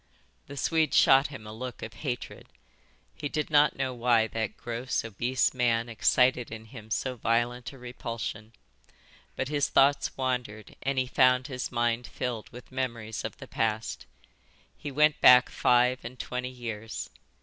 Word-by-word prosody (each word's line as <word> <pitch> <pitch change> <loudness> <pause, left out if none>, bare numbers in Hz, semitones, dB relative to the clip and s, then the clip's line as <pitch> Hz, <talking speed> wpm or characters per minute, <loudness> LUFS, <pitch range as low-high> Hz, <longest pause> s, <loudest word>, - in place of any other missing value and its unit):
The 140 - -9
Swede 160 +1 +1
shot 135 +2 +6
him 135 -7 -10
a 105 - -8
look 125 +2 -7
of 110 - -7
hatred. 125 -5 -5 0.7
He 145 -2 -5
did 155 +1 -2
not 150 -1 +5
know 130 -1 -2
why 120 -2 +3
that 110 -2 -3
gross, 120 0 -3
obese 120 +4 0
man 120 -2 +1
excited 125 +2 +2
in 110 -1 -8
him 110 -1 -12
so 125 +4 -1
violent 120 +2 0
a 135 - -13
repulsion. 115 -3 -6 0.8
But 130 - -2
his 145 -2 +1
thoughts 140 +1 +3
wandered 125 -5 -3
and 135 +1 -1
he 130 - +2
found 125 0 +3
his 130 -2 -4
mind 120 0 0
filled 120 -4 -4
with 125 +1 -13
memories 115 -4 -4
of - - -5
the - - -10
past. 110 0 -2 0.7
He 145 - -7
went 150 +2 +3
back 125 0 +8
five 125 +1 +3
and 125 +2 -8
twenty 125 +1 -4
years. 115 -3 -6
125 Hz, 160 wpm, -28 LUFS, 115-130 Hz, 0.8 s, back